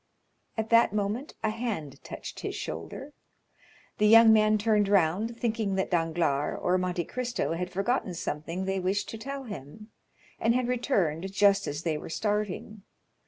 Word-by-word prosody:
At 220 +1 -2
that 230 -3 +5
moment 210 +7 -2
a 215 - +1
hand 215 - -4
touched - - -8
his - - -4
shoulder. 85 - -6 0.9
The 210 - +5
young 225 0 +8
man 215 0 +4
turned 210 -1 +2
round, 200 +5 +2
thinking 220 -4 -1
that 190 0 -1
Danglars 165 -4 0
or 185 +1 +1
Monte 180 -1 -1
Cristo 245 -6 -2
had 180 +2 -3
forgotten 195 0 -1
something 165 +4 -4
they 190 0 -1
wished 190 +2 -1
to 225 - -7
tell 275 +3 -5
him, 210 - -9 0.5
and 230 +1 +2
had 250 -1 +1
returned 195 - 0
just 200 0 +3
as 145 +2 -4
they 155 -3 -1
were - - -8
starting. 210 +2 -2
205 Hz, 160 wpm, -28 LUFS, 175-225 Hz, 0.9 s, young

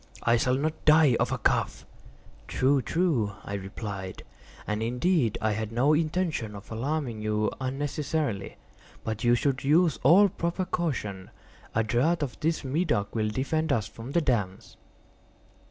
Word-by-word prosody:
I 120 - +4
shall 125 +2 +2
not 155 +3 -2
die 155 -4 +6
of - - +1
a - - 0
cough." - - 0 0.6
"True—true," 135 - +1
I 100 - -6
replied; 95 -1 -6 0.4
"and, 105 +1 -2
indeed, 125 - +1
I 110 - +1
had 110 +1 -3
no 130 +6 +3
intention 155 - -1
of 100 +2 -11
alarming 125 -1 -2
you 105 0 0
unnecessarily—but 130 -5 -4
you 120 0 +5
should 130 +1 0
use 160 +2 +3
all 180 +10 +7
proper 175 0 -2
caution. 110 - -3 0.5
A 115 - +3
draught 145 +9 +1
of 130 - -5
this 160 +1 0
Medoc 140 - 0
will 110 -2 0
defend 150 +7 -1
us 110 -7 +1
from 115 +5 -9
the 170 - +3
damps." 105 - -2
130 Hz, 140 wpm, -27 LUFS, 110-155 Hz, 0.6 s, all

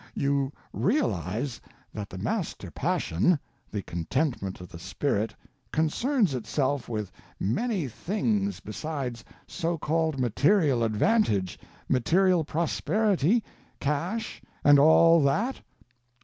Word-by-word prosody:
You 140 -1 +1 0.2
_realize 120 - 0 0.4
_that 105 -2 -5
the 95 - -8
Master - - -3
Passion—the 105 - -1
contentment 95 - -2
of 90 - -10
the 85 - -10
spirit—concerns 150 - -1
itself 130 +3 -1
with 105 -4 -3 0.3
many 175 - 0
things 200 - -1
besides 135 -7 -5 0.2
so 170 +1 -2
called 160 -2 0
material 135 - +3
advantage, 110 - +1 0.3
material 175 +7 +3
prosperity, 190 - +1 0.4
cash, 170 +11 -2 0.2
and 145 -1 +7
all 165 +2 +6
that? 155 - +1
145 Hz, 90 wpm, -27 LUFS, 115-180 Hz, 0.4 s, and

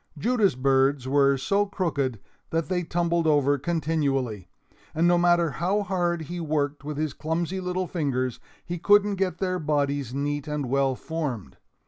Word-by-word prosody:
Judas' 215 - +2
birds 135 0 +2
were 140 0 +3
so 200 +9 +1
crooked 145 - -1 0.3
that 165 +1 -1
they 180 -1 0
tumbled 170 -1 0
over 145 -2 +3
continually; 140 - -1 0.5
and 165 +2 +3
no 175 - +5
matter 175 -2 +3
how 190 +7 0
hard 175 -3 -1
he 175 +4 -6
worked 150 -3 -1
with 150 0 -5
his 155 -2 -1
clumsy 170 +4 -2
little 185 0 -2
fingers, 130 -8 -2 0.3
he 175 0 -4
couldn't 205 +2 +4
get 185 -2 -1
their 185 -1 -1
bodies 145 -4 -1
neat 145 +2 -2
and 150 -2 -2
well 135 +1 +1
formed. 130 - -5
155 Hz, 155 wpm, -26 LUFS, 140-175 Hz, 0.5 s, no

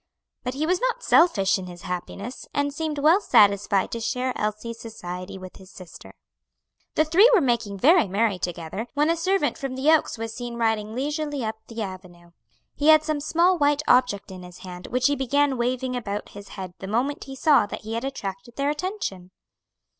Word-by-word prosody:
But 250 +1 -3
he 300 +3 -1
was 360 +2 +1
not - - -1
selfish 195 - +4
in 185 - -7
his 175 0 -11
happiness, 195 +6 -6
and 285 0 0
seemed 310 0 -3
well 315 +7 +4
satisfied 200 - +3
to 230 - -3
share 255 +2 -1
Elsie's 215 +2 -3
society 185 -4 -7
with 185 -1 -11
his 190 -1 -15
sister. 185 -3 -13 0.8
The 310 - +3
three 370 +10 +6
were - - +6
making 235 - 0
very 310 - +5
merry 200 0 0
together, 175 +5 -4
when 300 +3 +3
a - - +1
servant 370 -1 0
from 270 -2 -4
the 275 +4 +3
Oaks 315 -6 +2
was 225 0 -5
seen 240 0 -6
riding 225 -2 -1
leisurely 290 -1 -2
up 220 0 -3
the 230 -1 -5
avenue. 180 -3 -10 0.4
He 295 - -1
had 310 -1 +7
some 310 -1 -1
small 340 +4 +2
white 290 0 +2
object 245 -6 +2
in 185 -1 -9
his 180 0 -12
hand 180 0 -8
which 250 +1 -1
he 285 - +4
began 280 +1 +1
waving 250 +1 -1
about 210 -4 -4
his 200 0 -11
head 185 -2 -6
the 190 - -7
moment 250 +8 -1
he 270 - -8
saw 280 -5 +4
that - - -7
he 220 +1 -6
had 230 +2 -2
attracted 235 -3 -6
their 280 +1 0
attention. 300 - -4
240 Hz, 195 wpm, -24 LUFS, 200-290 Hz, 0.8 s, had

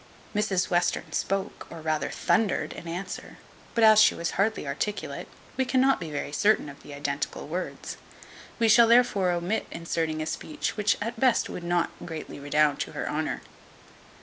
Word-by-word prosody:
Mrs 195 -4 0
Western 175 0 +1
spoke, 195 0 -2
or 165 - -8
rather 155 -2 -1
thundered, 215 -4 +1
in 170 - -9
answer; 180 +3 -6 0.4
but 230 - +3
as 215 -1 +8
she 215 - +6
was 170 - -2
hardly 210 -1 0
articulate, 145 0 -3 0.3
we 260 - +3
cannot 260 +1 +3
be 165 -3 -5
very 145 -1 -4
certain 205 0 +2
of 140 - -12
the 145 - -10
identical 140 0 -3
words; 180 +4 -5 0.6
we 230 - +3
shall 230 +1 +7
therefore 230 -6 +4
omit 175 +5 -1
inserting 165 -1 -2
a 155 - -2
speech 300 - -3
which 210 -1 +2
at 230 +1 -5
best 255 -1 +3
would 180 - -6
not 175 0 +1
greatly 160 -3 -7
redound 145 +1 +2
to - - -4
her - - -3
honour. - - -2
180 Hz, 170 wpm, -27 LUFS, 155-215 Hz, 0.6 s, as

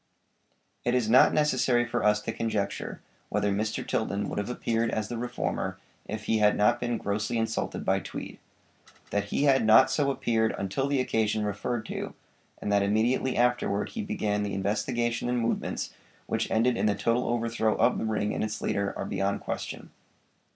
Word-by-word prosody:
It 120 - +1
is 125 -3 +1
not 130 - +7
necessary 130 -5 +2
for 120 -1 -2
us 105 0 +3
to - - -2
conjecture 110 -3 -3 0.3
whether 105 0 +1
Mr. 105 +2 -2
Tilden 100 -2 -1
would - - -3
have 100 - -3
appeared 115 -2 0
as 110 -2 -2
the 120 - -4
reformer 125 +1 -2 0.3
if 110 0 -5
he 110 0 +1
had 105 0 +4
not 105 - +3
been 120 -1 -1
grossly 105 +3 -2
insulted 115 0 -2
by - - +2
Tweed. - - -7 0.7
That 100 0 0
he 105 - -1
had 135 -3 +4
not 110 +5 +6
so 140 -1 +2
appeared 115 -4 +1
until 100 +8 -1
the 140 -1 +1
occasion 110 -3 +1
referred 110 +3 -2
to, - - -5 0.4
and 105 - -3
that 100 0 +4
immediately 115 +6 +1
afterward 120 -4 +1
he 225 - -4
began 105 - -1
the 100 -2 -2
investigation 120 +5 -1
and 125 - +1
movements 115 -1 -2 0.3
which - - -1
ended 120 +2 +2
in - - +1
the 105 - +2
total 115 +2 +1
overthrow 115 -2 +1
of - - +2
the - - -2
ring 105 -1 0
and - - -1
its 110 0 -3
leader, 100 0 -1
are - - -3
beyond 100 0 -1
question. - - -5
110 Hz, 180 wpm, -28 LUFS, 105-120 Hz, 0.7 s, not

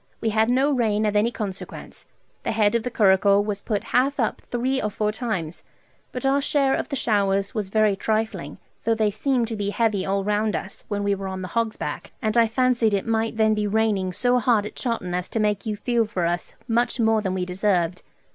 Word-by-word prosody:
We 225 - 0
had 220 +1 +2
no 265 +4 +3
rain 220 -5 +1
of 210 0 0
any 210 +3 +3
consequence. 200 -5 -7 0.3
The - - -2
head 215 -1 +3
of 235 - +2
the 250 - -3
curricle 200 -2 +4
was 205 -1 -3
put 210 -3 -2
half 275 +3 +2
up 225 - 0
three 260 +2 -1
or 210 - -1
four 210 +1 -1
times, 190 -8 -4 0.5
but 250 +1 -5
our 275 +1 +3
share 275 -1 +2
of - - -2
the 280 - -2
showers 200 -5 +1
was 210 -5 -3
very 215 -1 +3
trifling, 220 +2 -2 0.3
though 230 - +2
they 215 -1 +1
seemed 245 +2 0
to 225 - -3
be 205 -1 -2
heavy 210 -3 +1
all 195 0 0
round 210 +1 0
us, 195 - -6
when 205 -1 -2
we 200 0 +2
were 195 0 -4
on 190 0 -5
the 185 - -5
Hog's 230 -2 -1
back, - - -5
and 215 -3 -1
I 230 -1 +5
fancied 235 -2 +2
it 195 - -2
might 225 -1 -1
then 220 -1 +4
be 210 -1 0
raining 205 -3 +1
so 245 +6 +2
hard 225 -3 +2
at - - -8
Chawton 230 -8 -3
as 180 0 -2
to 225 - -2
make 210 0 0
you 215 - -1
feel 235 +2 +1
for 185 -5 -2
us 175 +1 -2
much 240 +2 +1
more 220 -1 +3
than 190 -2 -2
we 180 -1 -1
deserved. 180 -2 0
215 Hz, 225 wpm, -24 LUFS, 200-230 Hz, 0.5 s, I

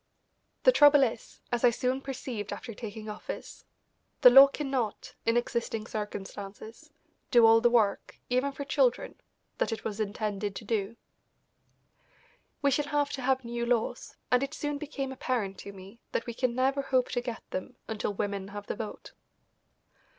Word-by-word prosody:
The - - +8
trouble 290 - +7
is, 230 -3 -3
as 240 0 -1
I 245 - +8
soon 255 +3 -1
perceived 250 -6 -5
after 230 - -6
taking 215 0 -7
office, 215 - -7 0.6
the 250 - +10
law 270 +2 +10
cannot, 270 -6 -3
in 230 +1 +4
existing 235 -2 -2
circumstances, 210 +5 -7 0.4
do 240 -3 +6
all 225 0 +7
the 240 - +5
work, 220 -4 +1
even 255 +3 +1
for 280 +1 -6
children, 270 -3 +1 0.4
that - - +1
it 225 - -4
was 210 -1 -4
intended 205 -1 -2
to 220 - -7
do. 215 0 -1 1.7
We 280 - +4
shall 290 +2 +1
have 290 -1 0
to 275 - -4
have 260 0 +1
new 235 0 -3
laws, 235 0 -1 0.2
and 250 0 +4
it 275 +3 -3
soon 295 -2 -3
became 280 -3 -4
apparent 235 -7 -2
to 200 - -8
me 195 +3 -13
that - - -1
we 235 - -5
can 245 0 -1
never 270 +2 +2
hope 260 -2 +1
to 245 - 0
get 240 -2 -6
them 185 - -5
until 215 -1 -2
women 200 -1 -3
have 205 0 -8
the - - -4
vote. 215 0 -7
240 Hz, 165 wpm, -29 LUFS, 215-270 Hz, 1.7 s, the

